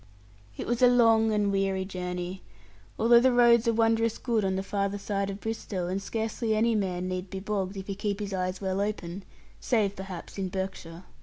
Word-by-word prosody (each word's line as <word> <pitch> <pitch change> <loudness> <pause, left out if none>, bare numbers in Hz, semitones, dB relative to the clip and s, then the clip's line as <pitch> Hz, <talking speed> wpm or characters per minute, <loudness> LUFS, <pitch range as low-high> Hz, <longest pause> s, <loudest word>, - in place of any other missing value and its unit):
It - - -4
was 240 +1 -1
a 250 - +8
long 225 -2 +5
and 205 -1 +1
weary 195 -1 0
journey, 180 0 -5 0.6
although 235 +1 +6
the 260 +2 +4
roads 240 -1 +5
are 230 - +4
wondrous 225 0 +2
good 230 -4 0
on 190 -1 0
the 190 - -2
farther 200 0 -1
side 200 0 -2
of 195 0 -5
Bristowe, 210 -4 -4
and 190 +2 -2
scarcely 220 +2 -2
any 230 +2 +2
man 185 -4 -1
need 185 0 -4
be 190 - -5
bogged, 195 -1 -3
if 190 - -6
he 195 - -4
keeps 200 +1 -3
his 200 -1 -4
eyes 185 0 -2
well 190 0 -1
open, 200 -3 -3 0.4
save, 210 -5 +1
perhaps, 190 0 -8
in 190 -1 -2
Berkshire. 190 -2 -5
200 Hz, 200 wpm, -28 LUFS, 190-225 Hz, 0.6 s, a